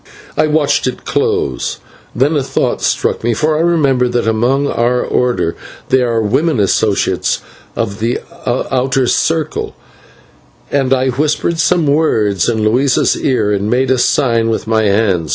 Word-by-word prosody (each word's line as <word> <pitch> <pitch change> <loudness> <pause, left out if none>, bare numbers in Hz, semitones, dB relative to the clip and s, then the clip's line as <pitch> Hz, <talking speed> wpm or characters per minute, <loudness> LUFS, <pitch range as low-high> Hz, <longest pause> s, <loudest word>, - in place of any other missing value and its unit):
I 155 - +2
watched 145 -2 +1
it 130 - -5
close, 65 -3 -1 0.4
then 145 +5 +1
a 145 - +1
thought 135 - -1
struck - - -1
me, 115 0 +1
for 155 +6 +1
I 155 - +1
remembered 140 -8 +1
that 120 -2 0
among 120 +6 +1
our 125 -2 0
Order 120 -9 0 0.3
there 125 -2 +2
are 115 -1 0
women, 135 +6 +1
associates 100 +1 +1 0.4
of 100 -3 -3
the 115 +3 -1 0.3
outer 130 +1 0
circle, 160 +4 -1 1.0
and 135 -2 0
I 130 0 +2
whispered 150 +5 -1
some 170 0 +2
words 110 - +1
into 110 -2 0
Luisa's 130 +4 +2
ear 110 -6 0
and 100 +1 -1
made 130 +2 +1
a 130 - +2
sign 115 -4 +2
with 115 - -2
my 110 -1 +1
hand. 100 -6 +1
125 Hz, 155 wpm, -15 LUFS, 110-140 Hz, 1.0 s, I